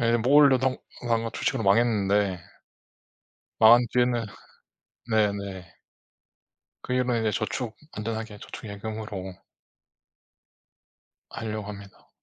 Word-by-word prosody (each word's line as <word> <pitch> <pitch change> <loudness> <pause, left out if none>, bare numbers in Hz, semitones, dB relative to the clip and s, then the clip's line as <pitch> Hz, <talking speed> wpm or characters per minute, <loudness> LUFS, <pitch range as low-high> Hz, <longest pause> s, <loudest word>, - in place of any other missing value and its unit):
예 115 0 +3
뭘 140 +5 +6
넣어도 130 -1 +2 0.3
망한 115 -1 0
주식으로 - - -1
망했는데 100 -3 +2 1.2
망한 120 +2 +7
뒤에는 120 -1 +2 0.9
네네. 100 -5 -1 1.1
그 - - -4
일만 125 -2 +1
이제 110 -1 +1
저축 110 +2 -3 0.2
안전하게 110 -1 -5
저축, - - -10
예금으로 100 -2 -6 1.9
하려고 110 -2 -5
합니다. 100 -1 -11
110 Hz, 220 characters per minute, -26 LUFS, 100-120 Hz, 1.9 s, 망한